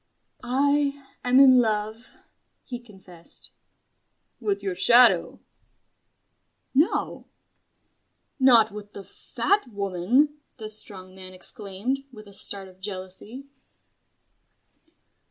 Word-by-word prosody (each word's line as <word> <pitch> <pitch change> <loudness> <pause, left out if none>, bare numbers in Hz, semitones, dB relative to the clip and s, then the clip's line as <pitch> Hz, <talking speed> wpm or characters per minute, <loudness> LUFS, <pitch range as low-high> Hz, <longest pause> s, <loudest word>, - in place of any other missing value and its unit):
"I 280 +2 +1 0.2
am 250 +1 +4
in 260 -2 +7
love," 220 0 -1 0.5
he 245 -2 -7
confessed. 190 -7 -13 0.9
"With 200 -3 -2
your 195 -2 -2
shadow?" 240 +7 +4 1.3
"No." 295 +6 0 1.1
"Not 235 -5 +5
with 205 0 -10
the 200 - -9
Fat 400 - -2
Woman!" 210 - 0 0.2
the 215 -3 -7
Strong 190 -3 -5
Man 185 0 -11
exclaimed, 205 +6 -3
with 215 -3 -13
a 200 - -13
start 195 0 0
of 185 0 -18
jealousy. 195 +6 -8
215 Hz, 95 wpm, -25 LUFS, 195-255 Hz, 1.3 s, in